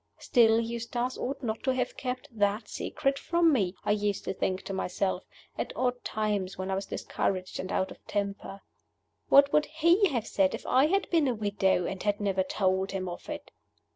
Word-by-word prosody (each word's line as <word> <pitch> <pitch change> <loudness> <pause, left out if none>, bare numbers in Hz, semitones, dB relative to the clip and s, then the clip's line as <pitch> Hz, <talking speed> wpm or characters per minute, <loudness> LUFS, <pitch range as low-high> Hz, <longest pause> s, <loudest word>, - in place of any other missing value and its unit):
Still, 225 -2 +4
Eustace 235 +2 -2
ought 270 +2 -4
not 225 -2 -2
to 260 -1 +1
have 250 -1 -1
kept 255 +2 -4
that 210 0 0
secret 275 0 -2
from 340 -2 +3
me, 195 -7 +1
I - - +2
used 205 -1 0
to - - -1
think 190 0 -2
to 195 - -5
myself, 190 0 -1 0.3
at - - -2
odd 250 -1 -1
times 205 -3 -1
when 190 +1 -3
I - - +1
was 195 +1 -2
discouraged 185 -1 -2
and 185 - -4
out 190 - 0
of - - -13
temper. 200 -1 -3 0.7
What 280 0 +7
would 300 - +4
he 335 +6 +4
have 240 -6 -1
said 190 -3 +2
if - - -10
I 265 +3 +4
had 390 +4 +1
been 325 -5 +3
a 250 - +1
widow, 200 -4 +1
and 190 +1 -4
had 205 -1 0
never 195 -2 +1
told 190 0 0
him 185 -1 -2
of 175 - -7
it? 295 -1 -6
215 Hz, 200 wpm, -29 LUFS, 195-260 Hz, 0.7 s, What